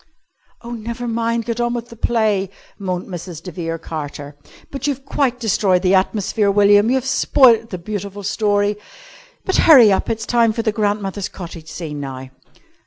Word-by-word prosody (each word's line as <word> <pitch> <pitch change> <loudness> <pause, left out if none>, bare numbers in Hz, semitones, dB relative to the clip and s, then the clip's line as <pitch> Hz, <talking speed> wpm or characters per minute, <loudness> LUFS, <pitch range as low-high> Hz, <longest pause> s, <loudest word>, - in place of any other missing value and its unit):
"Oh, 235 - -8
never 235 +1 -5
mind! 230 0 -1
Get 235 0 -2
on 240 0 0
with 240 0 -5
the 235 - -11
play!" 215 -4 0 0.3
moaned 185 -2 -3
Mrs. 175 -3 -8
de 180 - -7
Vere 165 0 -4
Carter. 145 -3 -7 0.4
"But 275 0 -4
you've 275 -1 -3
quite 265 -3 0
destroyed 205 -5 +1
the 185 0 +3
atmosphere, 200 +2 +1
William. 205 +2 +4
You've 260 0 +1
spoilt 235 -4 +4
the 185 - -5
beautiful 200 +2 -6
story. 205 0 0 0.7
But 380 - +1
hurry 255 -10 +7
up, 190 - 0
it's 225 0 -2
time 230 -2 +2
for 230 0 -3
the 220 - +1
grandmother's 205 -2 -2
cottage 170 -3 -9
scene 155 -2 -6
now." 130 -2 -7
205 Hz, 170 wpm, -19 LUFS, 185-235 Hz, 0.7 s, hurry